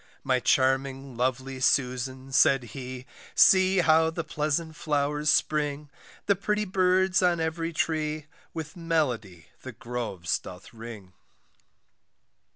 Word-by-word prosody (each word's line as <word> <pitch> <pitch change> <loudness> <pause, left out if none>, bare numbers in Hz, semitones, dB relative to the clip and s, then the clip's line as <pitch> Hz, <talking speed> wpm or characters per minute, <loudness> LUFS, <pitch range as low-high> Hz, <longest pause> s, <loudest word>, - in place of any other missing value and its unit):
My 130 -1 +1
charming 135 +1 +1
lovely 130 +2 -2
Susan, 130 0 0
said 135 -1 +4
he, 130 -1 -7 0.3
See 190 0 +5
how 160 -1 +4
the 165 +1 -4
pleasant 155 +1 -2
flowers 150 -1 -1
spring, 150 -1 0 0.3
The 200 - +3
pretty 210 +2 -1
birds 185 0 +2
on 175 -2 +2
every 165 +1 -2
tree, 155 -2 -2 0.3
With 160 +1 -7
melody 140 - -2
the 130 - -8
groves 110 -7 -3
doth 90 +4 -12
ring. 110 -5 -10
145 Hz, 115 wpm, -27 LUFS, 130-165 Hz, 0.3 s, See